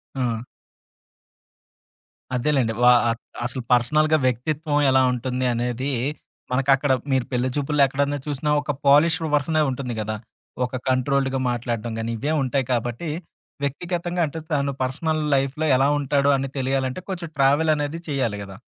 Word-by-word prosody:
ఆ! 120 -4 -1 1.9
అదేలెండి. 125 -3 +1
వా 125 - +8 0.2
ఆహ్, 115 0 -2 0.3
అసలు 125 +1 -3
పర్సనల్‌గా 155 +6 +4
వ్యక్తిత్వం 145 +4 0
ఎలా 130 - +5
ఉంటుంది 125 +1 -2
అనేది, 125 +3 -2 0.6
మనకక్కడ 135 +1 +2 0.2
మీరు 130 -2 +2
పెళ్లి 125 +1 0
చూపుల్లో 145 0 +1
ఎక్కడన్నా 140 +2 -1
చూసినా 145 +1 -2
ఒక 145 +1 -2
పోలిష్డ్ 160 +3 +4
వెర్షనే 155 +2 +1
ఉంటుంది 125 -2 -3
గదా! 110 0 -3 0.5
ఒక 125 - -6
కంట్రోల్డ్‌గా 135 +1 +1
మాట్లాడ్డం 120 -1 -3
గానీ, 115 +1 -2
ఇవే 145 +6 -1
ఉంటాయి 130 0 0
కాబట్టి, 120 +7 -2 0.5
వ్యక్తిగతంగా 175 +5 -2
అంటే 160 +3 -6
తను 140 -1 0
పర్సనల్ 155 +4 -1
లైఫ్‌లో 140 +4 0
ఎలా 135 +2 +3
ఉంటాడో 140 0 +2
అని 135 0 -3
తెలియాలంటే, 130 +3 -1
కొంచెం 170 -3 -5
ట్రావెలనేది 150 +2 +2
చేయాలి 125 -8 -1
గదా! 95 -1 -10
135 Hz, 130 wpm, -23 LUFS, 125-150 Hz, 1.9 s, వా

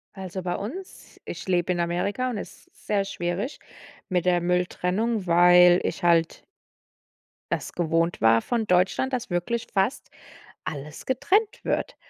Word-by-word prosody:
Also, 190 -1 -6
bei 175 -1 -2
uns 340 - -8
ich 170 +1 -7
lebe 180 -1 +1
in 175 - -1
Amerika, 180 +9 -1
und 240 - -3
es - - -9
ist - - -25
sehr 205 -2 +1
schwierig 195 - -4 0.5
mit 180 -1 0
der 175 -1 +3
Mülltrennung, 180 +4 0
weil 175 +1 +6
ich - - -3
halt 170 -1 +2 1.1
es - - -3
gewohnt 165 0 0
war 115 0 +5
von 235 -3 -1
Deutschland, 190 +9 +2
dass 245 -3 -2
wirklich 180 +7 -2
fast 195 +5 0 0.5
alles 150 +1 -7
getrennt 405 - +1
wird. - - -2
180 Hz, 145 wpm, -25 LUFS, 175-220 Hz, 1.1 s, weil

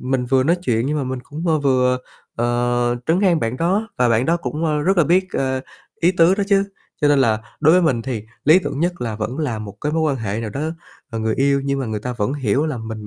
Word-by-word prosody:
mình 130 -1 -1
vừa 130 +1 +3
nói 170 +6 +2
chuyện 115 -6 0
nhưng 150 +2 -1
mà 140 - -2
mình 130 0 -3
cũng, 155 +6 -7
ơ, 155 - +3
vừa, 125 -3 +2 0.4
ờ, 120 0 +1
trấn 170 +4 +2
an 175 -5 +3
bạn 115 +2 -2
đó 195 +8 0
và 125 -1 +3
bạn 115 +2 +2
đó 165 +2 +3
cũng, 165 -1 -4
ơ, 150 -2 +1
rất 190 +5 +2
là 170 - +5
biết, 180 +5 +3
ờ, 130 -1 -1 0.4
ý 175 +2 +4
tứ 175 +1 +4
đó 200 - -1
chứ. 200 -1 +3 0.4
Cho 145 - +3
nên 145 -1 +4
là 115 -5 +3 0.2
đối 155 +1 +5
với 180 +1 +5
mình 130 -8 +1
thì 115 -4 -4 0.2
lý 155 +5 +7
tưởng 155 -5 -4
nhất 175 +1 -1
là 115 -3 -3
vẫn 115 +7 -4
là 130 -8 -2
một 105 -1 -8
cái 150 +1 -2
mối 160 - +1
quan 145 -4 +1
hệ 110 -1 -3
nào 110 -2 -4
đó, 135 - -5 0.5
ờ, 115 - -4
người 110 0 0
yêu 140 0 +2
nhưng 140 0 0
mà 130 - -2
người 110 -2 -3
ta 125 +3 -4
vẫn 115 +1 -2
hiểu 140 +2 0
là 150 - -3
mình 110 -2 -7
135 Hz, 270 wpm, -20 LUFS, 120-160 Hz, 0.5 s, lý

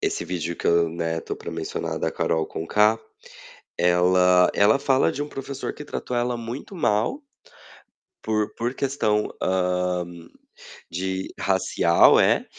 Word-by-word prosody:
esse - - -2
vídeo 85 -2 -4
que - - -4
eu, 85 -1 +3
né, 80 0 -3
estou - - -6
para - - -8
mencionar - - -4
da - - -1
Karol 80 -1 -1
Conká, 105 +7 +2 0.8
ela 90 +1 +4
ela 105 +6 +4
fala 135 -1 +2
de 145 - -4
um 145 - -5
professor 135 0 -5
que 150 - -10
tratou 125 -3 -4
ela 120 0 0
muito 120 - -7
mal 110 - 0 1.0
por 110 -1 -1
por 120 +3 -2
questão, 110 -6 0
hã, 90 -1 0 0.9
de 95 +2 -3
racial, 95 -3 +4
é, - - +3
95 Hz, 140 wpm, -24 LUFS, 90-120 Hz, 1.0 s, ela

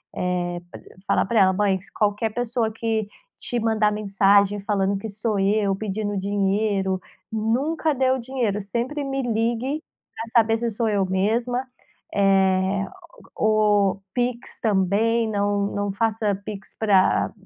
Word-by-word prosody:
eh, 175 -1 -2
p - - -9 0.3
falar - - +2
pra 225 +3 +1
ela: 190 -1 +5
"Mãe 200 0 +2
s 190 +1 -10
qualquer 210 +1 0
pessoa 240 -1 -1
que 220 -1 -2 0.3
te 245 - -2
mandar 220 -2 +2
mensagem, 200 -1 +3
falando 200 -1 0
que 220 - -6
sou 210 0 -2
eu 200 0 +2
pedindo 205 0 -3
dinheiro, 195 -1 0 0.3
nunca 260 +9 0
dê 260 -2 +2
o 260 - +1
dinheiro, 235 -5 -2
sempre 240 +9 -3
me 270 -1 -2
ligue 240 +5 -1 0.3
pra - - -5 0.2
saber 225 +1 0
se 235 0 -1
sou 225 +1 -1
eu 205 -2 +2
mesma, 230 +7 0 0.5
eh, 195 0 +2 0.5
ou 210 -2 +2
pix 245 -1 -3
também 220 +3 +2
não 205 -1 0
não 205 0 -1
faça 215 -1 0
pix 200 -2 -8
pra 200 -4 +3
210 Hz, 140 wpm, -23 LUFS, 195-230 Hz, 0.5 s, ela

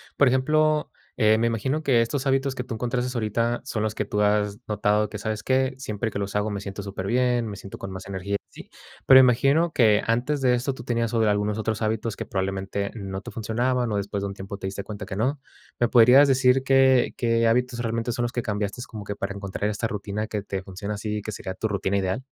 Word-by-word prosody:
Por 140 -3 +5
ejemplo, 155 +4 +2 0.3
eh, 110 0 +4
me 115 +1 +2
imagino 130 +7 -1
que 125 -5 +4
estos 135 +4 -1
hábitos 135 0 +1
que 125 - -3
tú 125 -3 -5
encontraste 125 +2 -2
ahorita 115 +1 -1
son 115 -6 -2
los 110 -1 -1
que 105 - -2
tú 105 +1 -1
has 105 0 +1
notado 105 0 +1
que, 105 - -6
¿sabes 110 +1 -4
qué? 130 0 +1
Siempre 110 -3 -3
que 100 - -4
los 100 0 -4
hago 105 +1 0
me 100 -1 -4
siento 100 0 -6
superbién, 120 +5 0
me 100 -2 -6
siento 100 - -9
con 95 - -7
más 95 +1 -8
energía, 100 +1 -3
¿sí? - - -13 0.4
Pero 130 0 +9
imagino 135 +6 +4
que 110 -4 +4
antes 120 +6 0
de 125 -1 +4
esto 130 +3 -1
tú 120 - -10
tenías 115 -1 -1
o 115 - +2
de 110 -1 +3
algunos 105 +1 0
otros 110 0 -2
hábitos 110 0 -1
que - - -5
probablemente 95 +1 -3
no 95 -2 -5
te - - -9
funcionaban 120 +2 -1
o 105 - 0
después 100 0 -3
de - - -1
un 100 - -5
tiempo 100 0 -7
te 95 - -5
diste 100 +1 -5
cuenta 105 0 -7
que 95 0 -6
no. 135 +5 0 0.4
¿Me 120 - +2
podrías 125 +4 +7
decir 130 0 +4
qué 135 -2 +4
qué 115 -1 +2
hábitos 125 +1 +1
realmente 115 0 -2
son 120 -1 -2
los 120 - -1
que 120 - -2
cambiaste 105 +2 -3
como 105 -3 -8
que 100 0 -5
para 100 0 -3
encontrar 100 +1 -3
esta 110 +2 -2
rutina 105 0 -4
que 105 -2 -3
te 95 -1 -4
funciona 100 +2 -5
así, 105 0 -3
que 110 - -6
sería 95 -2 -5
tu 110 - -2
rutina 100 -1 -1
ideal? 95 +7 -1
110 Hz, 235 wpm, -25 LUFS, 100-125 Hz, 0.4 s, Pero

